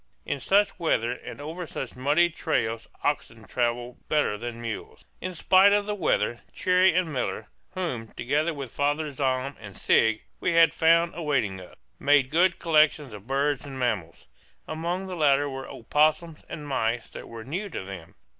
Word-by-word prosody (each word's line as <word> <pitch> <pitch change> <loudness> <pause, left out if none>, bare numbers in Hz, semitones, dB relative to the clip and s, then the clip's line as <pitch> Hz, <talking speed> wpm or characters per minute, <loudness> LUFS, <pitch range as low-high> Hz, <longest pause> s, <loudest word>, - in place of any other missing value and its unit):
In 140 - -2
such 200 +9 +2
weather 120 -8 +1
and 125 - -8
over 160 +4 -6
such 130 -3 -6
muddy 150 +7 +3
trails 115 -9 -1 0.2
oxen - - -2
travel 120 0 -2
better 150 -8 +2
than 115 +2 -6
mules. 115 -2 -6 0.2
In 185 -1 -4
spite 190 +4 +5
of 205 0 +2
the 210 - -2
weather 120 - 0
Cherrie 185 -1 +3
and 175 -4 +1
Miller, 125 - -3 0.3
whom, 145 -12 -3
together 145 +9 -1
with 140 -6 -6
Father 145 +1 0
Zahm 135 0 -1
and 100 -4 -10
Sigg, 110 -1 +3 0.2
we 170 - 0
had 165 0 +6
found 165 +1 +4
awaiting 140 - -1
us, 90 - -13 0.2
made 140 -2 +3
good 175 +3 +3
collections 155 -5 +3
of 105 +1 -11
birds 140 +1 0
and 140 -2 -8
mammals. 105 -10 -2 0.4
Among 170 +4 -3
the 185 -1 -5
latter 145 -3 +3
were 135 -1 -6
opossums 155 +5 +1
and 150 -2 -7
mice 115 -3 -1
that - - -9
were 115 -1 -8
new 180 - -4
to 160 - -5
them. 95 -4 -9
145 Hz, 170 wpm, -26 LUFS, 120-165 Hz, 0.4 s, had